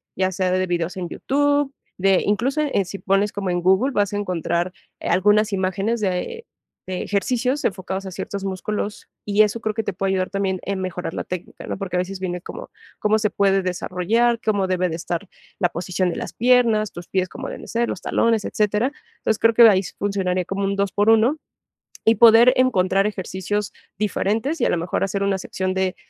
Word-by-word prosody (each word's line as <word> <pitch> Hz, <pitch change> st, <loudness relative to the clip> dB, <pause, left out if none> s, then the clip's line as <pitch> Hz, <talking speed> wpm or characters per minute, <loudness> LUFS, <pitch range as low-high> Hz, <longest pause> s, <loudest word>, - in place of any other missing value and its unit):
ya 185 Hz, 0 st, +1 dB
sea 185 Hz, 0 st, 0 dB
de 185 Hz, 0 st, +1 dB
videos 175 Hz, 0 st, -1 dB
en 175 Hz, -2 st, -4 dB
YouTube, 285 Hz, 0 st, +1 dB, 0.2 s
de 190 Hz, 0 st, +3 dB
incluso, 250 Hz, +9 st, +1 dB
eh, 235 Hz, -10 st, 0 dB
si 195 Hz, +2 st, -7 dB
pones 195 Hz, +1 st, +1 dB
como 195 Hz, -2 st, -3 dB
en 175 Hz, 0 st, 0 dB
Google, 190 Hz, +10 st, +3 dB
vas 205 Hz, -1 st, +1 dB
a 205 Hz, -, -1 dB
encontrar, 175 Hz, -2 st, -1 dB, 0.3 s
eh, -, -, -4 dB
algunas 210 Hz, +4 st, +3 dB
imágenes, 195 Hz, +4 st, -1 dB
de 210 Hz, -, -2 dB, 0.4 s
de 185 Hz, -1 st, -3 dB
ejercicios 250 Hz, +7 st, 0 dB
enfocados 190 Hz, 0 st, -2 dB
a 190 Hz, -, -6 dB
ciertos 195 Hz, +2 st, -5 dB
músculos. 205 Hz, +2 st, -4 dB, 0.2 s
Y 205 Hz, +1 st, +3 dB
eso, 210 Hz, +2 st, -1 dB
creo 215 Hz, -1 st, -1 dB
que 225 Hz, -, -1 dB
te 205 Hz, -, -2 dB
puede 195 Hz, +1 st, -1 dB
ayudar 185 Hz, 0 st, 0 dB
también, 195 Hz, -2 st, -1 dB
en 195 Hz, -1 st, -3 dB
mejorar 180 Hz, -2 st, -4 dB
la -, -, -4 dB
técnica, 180 Hz, -1 st, -7 dB
¿no?, -, -, -3 dB
porque, 185 Hz, -2 st, -3 dB
a -, -, +2 dB
veces 185 Hz, +1 st, -4 dB
viene 180 Hz, -1 st, -2 dB
cómo -, -, -9 dB, 0.3 s
cómo 215 Hz, +1 st, +2 dB
se 210 Hz, -1 st, +1 dB
puede 195 Hz, -1 st, +2 dB
desarrollar, 185 Hz, +6 st, 0 dB
cómo 205 Hz, -3 st, +1 dB
debe 185 Hz, 0 st, +1 dB
de 160 Hz, -, -3 dB
estar 175 Hz, +3 st, -4 dB, 0.3 s
la 175 Hz, -, +3 dB
posición 180 Hz, +1 st, -1 dB
de -, -, -3 dB
las -, -, -5 dB
piernas, 235 Hz, -3 st, +3 dB
tus 175 Hz, 0 st, -9 dB
pies 185 Hz, -1 st, 0 dB
cómo 265 Hz, +1 st, -6 dB
deben -, -, -8 dB
ser, 235 Hz, +1 st, 0 dB
los -, -, -4 dB
talones, 225 Hz, -2 st, +1 dB
etcétera. 215 Hz, +6 st, 0 dB, 0.2 s
Entonces, 220 Hz, -, 0 dB
creo 230 Hz, 0 st, +4 dB
que 235 Hz, -1 st, +9 dB
ahí 190 Hz, -2 st, +4 dB, 0.2 s
funcionaría, 185 Hz, -3 st, 0 dB
como 195 Hz, +2 st, -3 dB
un 200 Hz, 0 st, 0 dB
2 200 Hz, -1 st, 0 dB
por 205 Hz, +2 st, +3 dB
1, 225 Hz, +7 st, +4 dB, 0.7 s
y 225 Hz, -, +5 dB
poder 235 Hz, +2 st, +8 dB
encontrar 195 Hz, -6 st, +3 dB
ejercicios 200 Hz, 0 st, -3 dB, 0.3 s
diferentes, 215 Hz, -, 0 dB
y -, -, +3 dB
a -, -, +2 dB
lo -, -, +1 dB
mejor 170 Hz, +3 st, -1 dB
hacer 195 Hz, +1 st, -3 dB
una 195 Hz, -1 st, +1 dB
sección 185 Hz, 0 st, -3 dB
de, 190 Hz, -1 st, 0 dB
195 Hz, 205 wpm, -22 LUFS, 185-220 Hz, 0.7 s, que